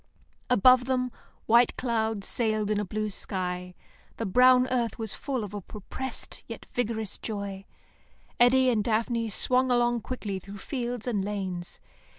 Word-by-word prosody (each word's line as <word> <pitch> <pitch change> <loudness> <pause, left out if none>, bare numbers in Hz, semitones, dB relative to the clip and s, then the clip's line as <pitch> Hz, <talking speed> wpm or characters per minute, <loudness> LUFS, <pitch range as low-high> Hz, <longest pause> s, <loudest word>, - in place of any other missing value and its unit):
Above 250 +1 +6
them 255 -1 0 0.3
white 235 +2 +4
clouds 220 -4 -1
sailed 215 -3 +1
about 210 -1 +1
a - - -3
blue 215 +2 -2
sky. 180 -2 -4 0.4
The 225 - -2
brown 250 +5 +5
earth 240 -2 0
was 220 -4 -4
full 265 -5 -3
of 205 -1 -7
a 205 - -4
repressed 260 +6 -7
yet - - -8
vigorous 220 -4 -2
joy. 200 -3 -5 0.7
Eddy 255 +1 +5
and 215 -3 +1
Daphne 230 +1 0
swung 255 +4 +2
along 240 -1 +2
quickly 210 -5 -4
through 200 +2 -10
fields 245 +1 -4
and 215 -6 0
lanes. 190 -3 -2
225 Hz, 150 wpm, -28 LUFS, 205-245 Hz, 0.7 s, Above